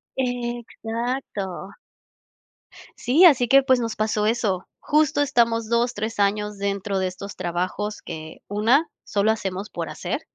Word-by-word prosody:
Exacto. 240 -4 -3 1.3
Sí, 285 +10 +5
así 260 -8 +6
que, 275 +3 +7
pues, 260 -2 +3
nos 230 -2 -2
pasó 215 -1 0
eso, 210 -5 0
justo 300 -1 +2
estamos 230 -5 +2
2, 235 +1 +2
3 220 +1 -4
años 210 +1 +1
dentro 200 0 -2
de 190 - 0
estos 190 +2 -6
trabajos 185 +4 -3
que, 155 0 -8
una, 230 +10 +2
solo 205 +1 +1
hacemos 195 -1 -3
por - - -4
hacer, - - -4
220 Hz, 135 wpm, -23 LUFS, 200-245 Hz, 1.3 s, que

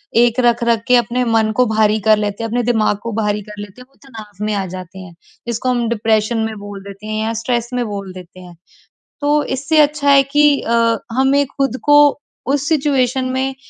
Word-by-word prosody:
एक 235 +1 +3
रख-रख 235 -2 +1
के 250 - +5
अपने 240 +1 +1
मन 225 -2 +1
को 250 - +3
भारी 220 -1 +1
कर 215 - +6
लेते 210 +1 -3
हैं, 225 - -3
अपने 245 +2 -1
दिमाग 220 -3 +1
को 230 - -4
भारी 210 0 -1
कर 210 +1 -12
लेते 205 +4 -11
हैं, 250 - -13
वो 275 - -32
तनाव 210 -4 -10
में 215 - -1
आ 200 -2 -2
जाते 185 +1 -10
हैं, 180 -2 -12 0.3
इसको 235 +2 -2
हम 240 -2 0
डिप्रेशन 220 0 0
में 220 - -5
बोल 200 -1 -9
देते 200 +1 -11
हैं 215 0 -2
या 225 - -2
स्ट्रेस 240 0 -2
में 245 -1 -1
बोल 200 -3 -6
देते 185 0 -12
हैं, 180 -1 -13 0.7
तो 295 +1 +2
इससे 275 +4 -1
अच्छा 295 -1 +2
है 275 -1 +6
कि 295 -1 +4
अ, 230 -1 +1
हमें 270 +3 +2
ख़ुद 270 -2 -2
को 290 -1 +5 0.3
उस 285 +1 -1
सिचुएशन 270 -4 +1
में 265 +1 -1
230 Hz, 210 wpm, -17 LUFS, 210-265 Hz, 0.7 s, कर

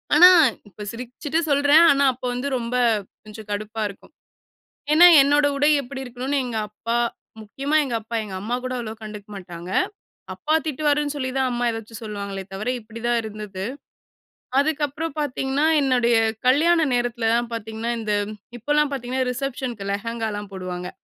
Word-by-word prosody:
ஆனா 355 +4 +10 0.4
இப்ப 210 +2 -10
சிரிச்சிட்டு 255 +6 -3
சொல்றேன். 285 +3 +6
ஆனா 280 0 +3
அப்ப 250 - -23
வந்து 250 +3 -3
ரொம்ப 235 0 -3 0.5
கொஞ்சம் 215 0 -11
கடுப்பா 215 +2 -4
இருக்கும். 200 +9 -14 0.8
ஏன்னா, 340 +3 +9 0.2
என்னோட 290 +1 +3
உடை 290 +2 +3
எப்படி 265 +1 -7
இருக்கணுனு 255 +3 -3
எங்க 240 -3 -4
அப்பா, 230 +3 -3 0.4
முக்கியமா 275 +8 -2
எங்க 250 - -4
அப்பா, 225 +2 -5
எங்க 200 -3 -7
அம்மா 225 +4 -3
கூட 255 - -4
அவ்வளோ 220 -2 -5
கண்டுக்க 210 -1 -9
மாட்டாங்க. 175 -2 -8 0.6
"அப்பா 310 - -1
திட்டுவாரு"ன்னு 295 -1 0
சொல்லி 260 -2 -2
தான் 260 -1 +1
அம்மா 245 0 -1
ஏதாச்சும் 225 -1 -7
சொல்லுவாங்களே 200 -2 -5
தவிர 210 +5 -4
இப்படிதான் 230 +2 -2
இருந்தது. 210 -3 -6 1.0
அதுக்கப்புறம் 300 +1 -2
பார்த்திங்கன்னா, 275 +1 0 0.2
என்னுடைய 245 -3 +3 0.3
கல்யாண 320 +4 +4
நேரத்துலலாம் 240 -1 0
பார்த்திங்கன்னா, 225 +1 -4
இந்த 215 -2 -1 0.4
இப்போலாம் 295 +4 +1
பார்த்திங்கன்னா, 260 -1 -2
ரிசப்ஷனுக்கு 250 -5 -4
லெஹெங்காலாம் 210 -1 -4
போடுவாங்க. 180 -1 -5
240 Hz, 140 wpm, -23 LUFS, 215-280 Hz, 1.0 s, ஆனா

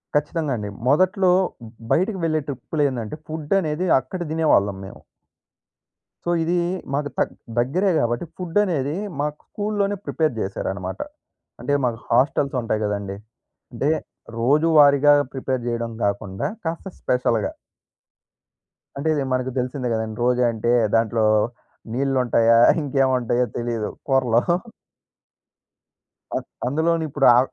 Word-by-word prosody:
ఖచ్చితంగా 150 0 0
అండి. 105 -1 -4 0.2
మొదట్లో 185 +5 +3 0.6
బయటికి 190 +2 +1
వెళ్ళే 155 -1 +1
ట్రిప్‌‌లో 145 +3 -2
ఏందంటే, 120 +1 -5
ఫుడ్ 155 +1 -3
అనేది 155 +3 -2
అక్కడ 155 +8 -7
దినేవాళ్ళం 105 -12 +2
మేము. - - -11 1.3
సో, 175 - +2
ఇది 170 - 0 0.4
మాకు 145 0 -1
తక్ - - 0 0.3
దగ్గరే 175 +11 +1
కాబట్టి, 120 +6 0
ఫుడ్ 180 +1 -4
అనేది 150 -6 -1 0.2
మాకు 150 +1 -1
స్కూల్‌లోనే 205 -1 -1
ప్రిపేర్ 155 -5 0
జేశారనమాట. 95 -1 -4 0.6
అంటే, 145 - -2
మాకు 115 -2 0
హాస్టల్స్ 140 0 +2
ఉంటాయి 110 -1 -1
కదండీ! 100 -1 -3 0.6
అంటే 140 +6 0 0.5
రోజువారీగా 145 +2 +5 0.2
ప్రిపేర్ 130 -1 -2
జేయడం 115 -1 -2
కాకుండా, 100 -1 -2 0.2
కాస్త 165 +4 -3
స్పెషల్‌గా. 120 -4 0 1.5
అంటే, 160 +3 -1
ఇది 145 -3 0
మనకు 130 0 -1
తెలిసిందే 125 0 -2
కదండీ! 110 -1 -3
రోజూ 125 0 +2
అంటే 115 +1 -1 0.2
దాంట్లో 115 0 +2 0.7
నీళ్లు 135 +1 0
ఉంటాయా? 115 -1 +4 0.2
ఇంకేమి 135 -2 +1
ఉంటాయో 120 +1 +1
తెలీదు 120 -2 -2 0.2
కూరలో. 125 -4 +3 1.9
అం - - 0 0.3
అందులోని 160 +4 +1
ఇప్పుడు 140 -1 +1
ఆ, - - +7
135 Hz, 120 wpm, -22 LUFS, 115-155 Hz, 1.9 s, ఆ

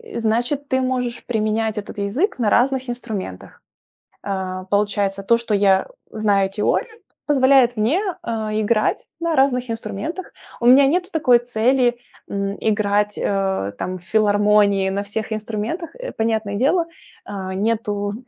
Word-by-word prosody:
э, - - -1
значит, 245 +6 0
ты 260 0 +1
можешь 250 -2 -1
применять 220 -1 -1
этот 210 +2 -6
язык 250 - -1
на 215 -3 +2
разных 260 +1 +2
инструментах. 205 - -6 0.6
А, 185 -2 -4
получается, 200 0 0
то, 230 +4 +4
что 230 -2 -3
я 195 -1 +3 0.2
знаю 200 -3 +1
теорию, 440 - -1 0.3
позволяет 265 -3 +4
мне, 240 - +2 0.2
э, - - -6 0.3
играть 215 0 +1
на 335 -1 0
разных 255 -2 +2
инструментах. 225 - -5 0.3
У - - -1
меня 270 +2 +8
нету 360 +5 0
такой 250 -7 +4
цели, 245 +1 +2 0.4
м, 200 0 -2
играть, 210 -1 +1
э, 190 - -1
там 185 0 -3
в 180 - -16
филармонии 205 -1 +3
на 200 +1 -1
всех 220 +2 -5
инструментах. 220 - -4
Э, - - -6
понятное 220 -2 -1
дело, 325 - +2 0.4
э, 190 -2 -5
нету 205 0 -1
220 Hz, 140 wpm, -21 LUFS, 200-250 Hz, 0.6 s, меня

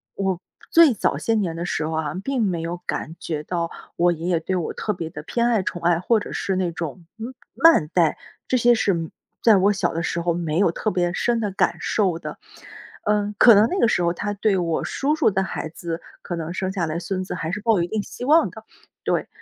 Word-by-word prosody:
我 190 -3 -1 0.3
最 330 -5 +7
早 - - 0
些 225 - 0
年 185 -6 -1
的 170 - -4
时 160 -3 -2
候 160 - -3
啊， 160 -1 -2
并 270 -3 -1
没 180 -6 0
有 170 +1 -3
感 160 - -3
觉 150 -3 -4
到 170 0 -2 0.3
我 175 0 +3
爷 165 +1 -4
爷 170 -2 +2
对 185 +3 -2
我 175 -3 -2
特 210 - -2
别 170 -4 -5
地 150 - -7
偏 235 +9 -1
爱、 225 -5 +2
宠 175 -2 -4
爱， 170 -1 +3
或 220 +4 +2
者 - - -7
是 190 - -1
那 185 -2 0
种， 165 +1 -6
嗯， 240 +4 -6 0.2
慢 325 - +5
待， 170 -4 +3 0.3
这 255 - +2
些 240 0 +5
是 210 -3 +2
嗯， 165 -2 -3 0.3
在 220 -4 +7
我 200 +2 +4
小 195 - -1
的 165 - -2
时 170 0 -2
候 170 0 +1
没 165 -2 -2
有 190 -4 +4
特 215 - -2
别 175 -3 0
深 235 +4 +1
的 210 -3 -1
感 190 - +1
受 190 -6 +1
的。 170 - -8 0.6
嗯， 210 0 +1
可 235 -3 +9
能 210 +2 +6
那 375 - -2
个 235 - +5
时 180 - +1
候 170 0 +2
他 205 +4 -3
对 205 0 +1
我 165 -2 -1
叔 290 +3 0
叔 315 -8 +3
的 190 - +1
孩 190 - -4
子， 165 0 -5 0.2
可 175 - -4
能 165 0 -4
生 190 0 -2
下 185 -4 -1
来 160 +2 -3
孙 185 +1 -3
子 - - -5
还 165 -2 -3
是 190 - -2
抱 225 0 +2
有 170 - +2
一 - - -2
定 215 0 -2
希 245 - -7
望 310 -2 +5
的， 220 +4 -11 0.4
对。 - - 0
185 Hz, 265 characters per minute, -23 LUFS, 170-215 Hz, 0.6 s, 可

